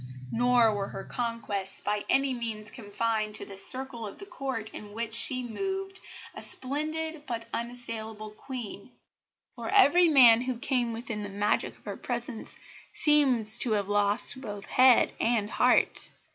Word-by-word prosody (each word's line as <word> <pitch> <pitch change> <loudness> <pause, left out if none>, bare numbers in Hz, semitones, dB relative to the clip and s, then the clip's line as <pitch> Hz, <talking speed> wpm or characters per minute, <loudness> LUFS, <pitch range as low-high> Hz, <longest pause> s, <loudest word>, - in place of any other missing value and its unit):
Nor 240 -2 +4
were 200 -1 -3
her 195 - -7
conquests 230 -5 -3
by 210 0 -2
any 270 0 +2
means 225 -3 -5
confined 215 -1 -2
to - - -5
the 195 -1 -8
circle 255 +1 -3
of 200 - -10
the 400 - -10
Court 260 - -4
in 205 -1 -10
which 225 0 -4
she 255 +2 +2
moved 385 - -4 0.3
a - - -8
splendid, 310 +3 -1
but 230 -2 -3
unassailable 225 -3 -5
Queen, 245 -1 -8 0.7
for - - -6
every 355 -3 +5
man 240 -6 +7
who 255 -1 -3
came 245 -2 0
within 230 -2 -5
the 205 - -5
magic 205 +1 -1
of - - -27
her 200 -2 -5
presence 240 -1 -4 0.3
seems 255 -7 +4
to 235 - +5
have 205 -1 -1
lost 205 +5 +1
both 205 -5 -7
head 255 -1 +5
and 225 -2 0
heart. - - +2
235 Hz, 155 wpm, -28 LUFS, 215-260 Hz, 0.7 s, man